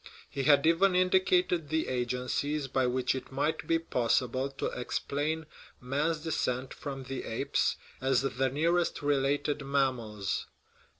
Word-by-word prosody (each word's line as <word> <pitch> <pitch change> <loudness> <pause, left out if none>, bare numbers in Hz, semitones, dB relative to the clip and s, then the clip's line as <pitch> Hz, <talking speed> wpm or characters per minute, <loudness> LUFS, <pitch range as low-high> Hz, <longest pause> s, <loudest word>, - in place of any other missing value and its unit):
He 135 -1 -2
had 145 -1 +5
even 180 +3 +4
indicated 180 -3 +3
the 160 +1 0
agencies 125 +4 -1
by 130 -1 +1
which 125 0 +1
it 130 0 -6
might 145 +4 -1
be 165 - +3
possible 130 -3 0
to 135 - -5
explain 150 +5 -2 0.3
man's 150 +5 -1
descent 130 -5 -1
from 135 -2 -6
the 130 0 -5
apes 115 - 0 0.3
as 130 0 +2
the 135 0 0
nearest 165 +4 +1
re 145 0 +3
lated 145 +2 0
mammals. 125 -7 -1
140 Hz, 135 wpm, -30 LUFS, 130-160 Hz, 0.3 s, had